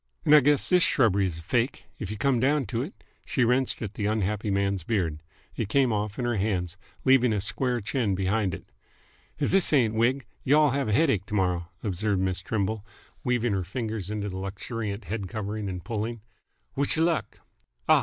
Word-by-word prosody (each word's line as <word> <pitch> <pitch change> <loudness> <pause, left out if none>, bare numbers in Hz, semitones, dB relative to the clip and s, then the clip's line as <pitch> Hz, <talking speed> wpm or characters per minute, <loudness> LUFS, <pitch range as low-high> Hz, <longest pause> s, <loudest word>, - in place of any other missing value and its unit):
"'nd - - +7
I 150 - +10
guess 145 +3 +2
all 180 - +7
this - - +2
shrubbery 100 - +3
is 85 -3 -5
fake, 120 - -1
'f 100 - -4
you 105 - -4
come 135 0 +2
down 140 +2 +2
to 115 +3 -2
it!" 155 +10 -8 0.2
She 125 - 0
wrenched 125 +1 +1
at 105 -2 -5
the 105 -1 -2
unhappy 105 0 -1
man's 100 -1 +1
beard. 85 -7 -1 0.3
It 110 - -2
came 130 -1 +3
off 105 0 -2
in 125 - -1
her 120 -2 0
hands, 90 -4 -1 0.3
leaving 130 -3 +5
a 105 - +1
square 120 +4 -1
chin 110 -2 0
behind 95 0 0
it. - - -12 0.7
"If - - 0
this 195 -2 +3
ain't 120 -7 +3
a - - -4
wig, 130 +3 +2 0.2
y'll 150 +1 +4
have 140 -1 0
a - - 0
headache 110 - +2
t'morrow," 90 -4 0 0.2
observed 100 0 0
Miss 95 -1 -1
Trimble, 105 0 -2 0.4
weaving 120 -3 +1
her 95 -1 0
fingers 110 0 -4
into 105 -1 -3
his 100 - -4
luxuriant 100 +3 -4
head 100 +2 -3
covering 105 -1 -4
and 90 -2 -6
pulling. 110 +2 -3 0.5
"Wish 140 +3 0
y' - - +2
luck! 165 -1 -1 0.5
Ah! - - +6
110 Hz, 200 wpm, -27 LUFS, 100-125 Hz, 0.7 s, I